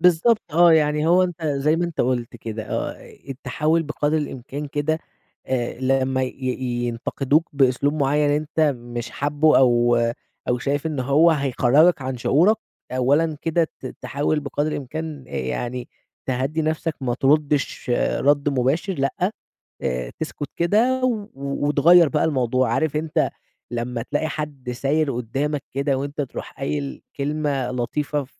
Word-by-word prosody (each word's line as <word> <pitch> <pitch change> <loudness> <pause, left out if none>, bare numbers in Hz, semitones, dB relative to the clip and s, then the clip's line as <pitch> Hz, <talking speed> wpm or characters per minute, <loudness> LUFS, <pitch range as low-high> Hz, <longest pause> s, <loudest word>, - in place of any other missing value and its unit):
بالضبط 180 +6 +4
آه، 170 0 +7
يعني 150 0 +3
هو 180 +2 +5
أنت 175 -2 -3
زي 145 +2 +1
ما 175 - 0
أنت 170 -2 -3
قُلت 120 -2 -1
كده 110 -1 -5
آه، - - -2
أي - - -16
التحول 150 +5 0
بقدر 150 0 -1
الإمكان 145 -1 -4
كده 150 +2 -1 0.5
آآ، 125 -1 -2
لمّا 130 0 +1
ي 130 - -2 0.5
ينتقدوك 135 +6 0
بإسلوب 140 +1 +2
معيّن 145 0 +2
أنت 150 +2 -1 0.2
مش 120 0 -6
حابه 145 +2 +3
أو 120 -2 +4 0.5
أو 125 - +2
شايف 140 +4 -1
إن 150 -4 -2
هو 140 +6 +4
هيخرّجك 140 +2 +3
عن 130 0 -3
شعورك، 170 - +3 0.4
أولًا 145 +5 +2
كده 165 +1 +2 0.2
ت - - -6
تحاول 145 +2 -1
بقدر 145 +1 -2
الإمكان 150 +1 -5
آآ، - - -15
يعني 120 - -3 0.4
تهدّي 135 +5 -1
نفسك 160 +1 -1
ما 125 -3 -1
تردش 145 0 +1 0.3
رَد 145 +1 +3
مباشر 140 +8 0
لأ، 175 +7 -1 0.5
آآ، 60 -1 -2
تسكت 150 -2 -4
كده 225 +9 +2
و 235 -4 0
و 140 +1 -2
وتغيّر 160 +3 +6
بقى 150 - +1
الموضوع 130 -4 +1
عارف 155 +2 0
أنت 155 0 +1 0.4
لما 120 0 -3
تلاقي 145 +6 -1
حد 145 -5 -5
ساير 140 +4 0
قدّامك 135 +5 -2
كده 140 0 0
وأنت 140 +2 -3
تروح 135 - -6
قايل 140 0 -3 0.2
كلمة 140 -3 -1
لطيفة 140 +3 -2
145 Hz, 145 wpm, -22 LUFS, 130-155 Hz, 0.5 s, آه